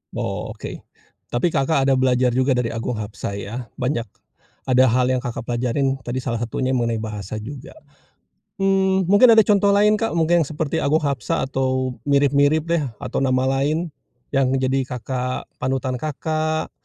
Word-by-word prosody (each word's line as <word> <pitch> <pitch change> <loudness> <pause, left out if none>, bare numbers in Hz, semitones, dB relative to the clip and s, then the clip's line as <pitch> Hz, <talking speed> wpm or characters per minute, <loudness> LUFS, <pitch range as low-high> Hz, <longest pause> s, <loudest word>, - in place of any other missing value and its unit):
Oke. - - -5 0.5
Tapi 120 +8 +1
Kakak 140 -2 +1
ada 135 - +4
belajar 125 -1 +2
juga 130 +1 +2
dari 125 -2 +1
Agung 115 0 -3
Hapsah 105 -1 -5
ya, 105 +4 -6 0.2
banyak 125 -2 0 0.6
ada 130 0 +5
hal 125 +1 +2
yang 130 0 0
Kakak 120 -1 -5
pelajarin 125 +3 0
tadi 125 +2 -3
salah 120 -2 -3
satunya 130 +3 -1
mengenai 115 -2 0
bahasa 105 -1 -5
juga. 135 +5 -9 0.9
Mmm, 190 -1 +2
mungkin 215 +5 +7
ada 220 - +7
contoh 200 0 +3
lain, 210 +1 +4
Kak, 225 -6 -1
mungkin 165 -2 +2
seperti 155 -2 -2
Agung 155 +2 +1
Hapsah 140 -7 -1
atau 130 -1 -1
mirip-mirip 145 +2 +3
deh 170 -3 +1 0.2
atau - - -2
nama 130 -1 +1 0.2
lain 155 +3 -1 0.4
yang 135 -2 +2
menjadi 130 0 0
Kakak 125 0 -4
panutan 130 -1 -2
Kakak, 155 +1 -2
135 Hz, 155 wpm, -21 LUFS, 125-155 Hz, 0.9 s, mungkin